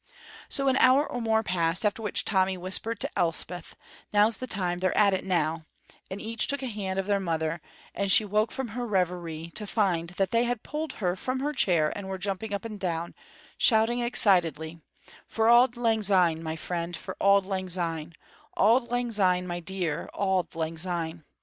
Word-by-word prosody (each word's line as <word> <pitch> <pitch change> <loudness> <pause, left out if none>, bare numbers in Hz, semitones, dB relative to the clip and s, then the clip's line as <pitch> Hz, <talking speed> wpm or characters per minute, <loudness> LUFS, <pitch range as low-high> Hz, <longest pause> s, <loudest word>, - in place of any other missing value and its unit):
So 275 -1 +3
an 265 0 +3
hour 270 +3 +5
or 245 - -5
more 220 -1 +1
passed, 175 0 +1
after 210 +2 0
which 210 - 0
Tommy 190 -2 +1
whispered 195 +5 -1
to - - -1
Elspeth: 175 -1 -1 0.4
"Now's 210 +2 +3
the 255 - -6
time; 180 -5 -2
they're 185 0 0
at 200 -2 +5
it 190 - -1
now," 160 -3 -1 0.4
and 190 - -6
each 225 +1 -3
took 280 -1 +1
a - - -2
hand 200 -5 -4
of 195 - -1
their 200 0 +1
mother, 165 -2 -2 0.3
and 200 -1 -1
she 210 +2 +7
woke 210 +2 0
from 265 -3 -4
her 240 +3 -4
reverie 175 -4 -2
to 210 - -3
find 180 -6 0
that 195 -2 0
they 230 +1 +2
had 240 -2 -2
pulled 305 +1 -4
her 180 -4 -1
from 255 +7 -3
her 295 +2 -1
chair 170 - +2
and 200 -2 -6
were 190 - -4
jumping 195 +3 -4
up 200 +1 -4
and 215 -2 -7
down, 170 -2 -3 0.5
shouting, 225 +1 +3
excitedly, 170 -8 +2 0.5
"For 225 0 0
Auld 240 +1 +5
Lang 225 -2 +1
Syne, 180 -5 +3
my 160 -1 -4
dear, 170 +1 -4
for - - -8
Auld 200 -1 +4
Lang 190 -1 -3
Syne, 165 -2 -2 0.4
Auld 235 +4 +3
Lang 245 0 -1
Syne, 185 -4 +2
my 175 -1 -4
dear, 175 -3 -3
Auld 190 -3 -1
Lang 160 0 -3
Syne." 170 -2 -2
190 Hz, 195 wpm, -27 LUFS, 175-220 Hz, 0.5 s, she